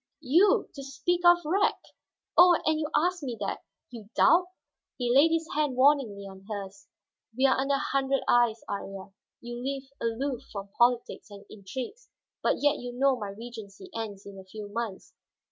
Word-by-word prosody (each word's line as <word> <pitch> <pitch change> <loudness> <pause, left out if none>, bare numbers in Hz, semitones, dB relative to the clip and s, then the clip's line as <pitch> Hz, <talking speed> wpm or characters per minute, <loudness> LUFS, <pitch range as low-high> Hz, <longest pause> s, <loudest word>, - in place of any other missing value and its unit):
You, 340 +9 +4
you - - -19
to 275 - -8
speak 315 +6 -1
of 345 0 +8
wreck! 380 +6 +1 0.6
Oh, 355 -1 +7
and 315 0 +2
you 300 -1 -2
ask 355 +2 +1
me 250 -5 -4
that, 200 - -2 0.3
you 220 -4 -10
doubt?" 360 +2 +5 0.5
He 245 -1 0
laid 290 +4 +7
his 325 0 0
hand 295 -3 0
warningly 255 -7 +3
on 190 0 -12
hers. 195 -2 -7 0.5
"We 265 - +3
are 265 - +5
under 275 +1 +1
a - - +1
hundred 275 0 0
eyes, 240 -2 +3
Iría. 195 -1 -6 0.3
You 240 +1 -7
live 275 0 -3 0.2
aloof 240 +3 -2
from 200 -1 -7
politics 240 -1 +1
and 200 0 -12
intrigues, 255 - -8 0.3
but - - 0
yet 290 0 +3
you 245 0 -6
know 270 +2 +3
my 210 -5 -5
regency 225 - -10
ends 210 -3 -6
in 200 -1 -10
a - - -10
few 205 +2 -9
months." 220 -2 -5
245 Hz, 180 wpm, -28 LUFS, 205-290 Hz, 0.6 s, of